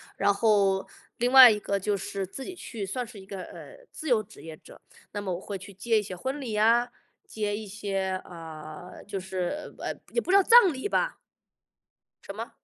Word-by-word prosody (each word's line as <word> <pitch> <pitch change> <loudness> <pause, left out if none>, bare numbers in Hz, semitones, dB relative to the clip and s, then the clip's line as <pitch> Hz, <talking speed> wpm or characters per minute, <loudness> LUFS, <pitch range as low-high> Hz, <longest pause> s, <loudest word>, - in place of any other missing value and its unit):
然 200 - +3
后， 200 -2 +2 0.3
另 245 +1 0
外 260 -3 +11
一 210 - 0
个 200 0 -1
就 200 +1 -1
是 195 +1 -4
自 260 +8 -8
己 370 - -7
去 225 - -6
算 250 +6 -3
是 220 -3 -12
一 190 - -12
个， 195 -1 -7
呃， - - -12
自 315 - -8
由 225 -4 +3
职 205 - -16
业 160 -1 -8
者， - - -16 0.3
那 205 - -4
么 195 -3 -3
我 175 - -5
会 200 -1 -5
去 195 +2 -12
接 220 +3 +1
一 - - -1
些 190 -2 -7
婚 265 +10 -4
礼 240 -6 -4
啊， 230 +3 +4 0.4
接 210 -1 -2
一 215 -1 -7
些， 195 -2 -3
呃， 160 0 -10
就 200 -1 -4
是， 190 +9 -4
呃， - - -3 0.2
也 470 - +2
不 365 - -2
知 395 - +7
道 - - +7
葬 460 -5 +7
礼 265 +8 -4
吧。 - - 0 1.2
什 - - -4
么？ - - -21
205 Hz, 230 characters per minute, -27 LUFS, 190-245 Hz, 1.2 s, 外